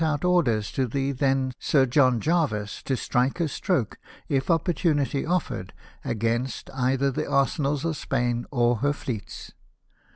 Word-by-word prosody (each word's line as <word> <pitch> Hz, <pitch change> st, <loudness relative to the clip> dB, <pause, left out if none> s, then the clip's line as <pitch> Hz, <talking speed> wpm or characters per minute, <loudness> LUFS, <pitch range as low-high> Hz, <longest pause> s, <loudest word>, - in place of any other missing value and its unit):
307 155 Hz, -2 st, +2 dB
out 180 Hz, -, -4 dB
orders 115 Hz, -12 st, +1 dB
to 130 Hz, -1 st, 0 dB
the 135 Hz, +3 st, -1 dB
then 135 Hz, -1 st, +1 dB
Sir 135 Hz, -3 st, +3 dB
John 130 Hz, -2 st, +3 dB
Jervis 140 Hz, -, 0 dB
to 130 Hz, -, 0 dB
strike 130 Hz, +8 st, 0 dB
a 170 Hz, -, +1 dB
stroke, 145 Hz, -, -1 dB, 0.3 s
if 135 Hz, +2 st, 0 dB
opportunity 155 Hz, -4 st, +1 dB
offered, 180 Hz, 0 st, -2 dB, 0.3 s
against 115 Hz, +3 st, -2 dB
either 135 Hz, +1 st, +1 dB
the 130 Hz, -, -3 dB
arsenals 140 Hz, +1 st, +1 dB
of 165 Hz, -1 st, 0 dB
Spain 120 Hz, -3 st, -1 dB
or 120 Hz, -3 st, +2 dB
her 145 Hz, +5 st, +1 dB
fleets. 115 Hz, -7 st, -6 dB
135 Hz, 150 wpm, -25 LUFS, 125-150 Hz, 0.3 s, Sir